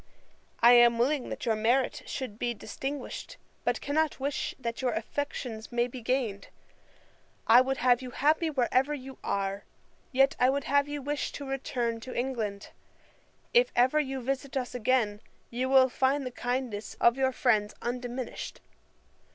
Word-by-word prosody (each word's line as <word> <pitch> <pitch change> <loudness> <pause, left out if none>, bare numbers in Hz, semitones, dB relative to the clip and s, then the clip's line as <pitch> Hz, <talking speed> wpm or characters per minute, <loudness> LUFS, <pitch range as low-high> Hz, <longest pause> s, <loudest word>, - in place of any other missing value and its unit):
I 235 +1 +8
am 240 -1 +6
willing 260 +3 +1
that - - -5
your 225 -2 +2
merit 240 +4 +1
should 240 -6 -5
be 240 -1 -1
distinguished; 275 - -6 0.3
but - - 0
cannot 305 0 0
wish 280 +1 -2
that 235 -2 -4
your 250 -2 0
affections 225 -2 -4
may 240 0 +2
be 250 0 -8
gained. 230 -4 -1 1.0
I 240 +2 +8
would 265 +1 -1
have 245 0 +3
you 255 - -6
happy 310 +6 +2
wherever 265 +1 +1
you 265 -1 -10
are: 195 0 -2 0.5
yet 270 +1 +4
I 250 - +5
would 280 +1 0
have 285 +1 +2
you 290 -1 -5
wish 290 +1 -2
to 285 - -6
return 245 -4 -2
to 250 +2 -8
England. 225 -6 -3 0.8
If - - +5
ever 255 +5 +4
you 270 -3 -2
visit 270 +2 -3
us 255 -1 -3
again, 225 -3 +1 0.3
you 250 +2 -1
will 265 -1 +6
find 265 +2 +1
the 255 - -4
kindness 245 -4 -3
of 235 - +5
your 265 -1 +1
friends 220 -6 +1
undiminished. 245 0 -4
255 Hz, 160 wpm, -29 LUFS, 235-270 Hz, 1.0 s, I